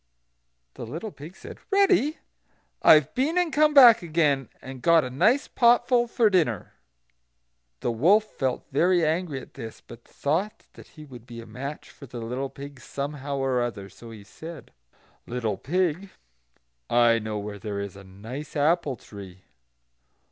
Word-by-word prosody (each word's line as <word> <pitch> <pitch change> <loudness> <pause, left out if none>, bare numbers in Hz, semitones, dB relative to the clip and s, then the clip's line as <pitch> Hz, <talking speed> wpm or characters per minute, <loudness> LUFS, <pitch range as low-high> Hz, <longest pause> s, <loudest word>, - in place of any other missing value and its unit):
The - - -9
little 165 - -6
pig 160 +4 -12
said: - - -11
"Ready! 385 - +3 0.6
I - - +8
have 150 -3 +1
been 295 +7 0
and 355 -3 +1
come 305 0 +4
back 245 -5 +9
again, 155 -6 0
and 130 -1 -10
got 165 +2 +4
a 125 - -5
nice 210 - +2
potful 240 0 +3
for 230 -1 +3
dinner." 160 - 0 1.1
The - - -1
wolf 175 - +4
felt 135 -11 -3
very 175 +4 +3
angry 160 -2 -1
at - - -15
this, 110 -1 -9
but 115 - -14
thought 190 +10 -3
that - - -14
he 155 - -10
would 125 -4 -13
be 120 -1 -9
a 115 - -9
match 140 +5 -8
for 140 - -13
the 125 - -9
little 125 +4 -4
pig 140 0 -10
somehow 140 0 -5
or 135 -2 0
other, 110 -5 -4
so 115 +5 -13
he 110 -3 -11
said: 160 - -11 0.6
"Little 115 -4 -2
pig, 180 +3 -1 0.8
I 120 -1 +4
know 110 -1 -4
where 105 0 -6
there 100 0 -5
is 100 -2 -6
a 100 - -12
nice 110 +10 -9
apple 150 -1 +1
tree." 95 -4 -12
140 Hz, 160 wpm, -25 LUFS, 120-180 Hz, 1.1 s, back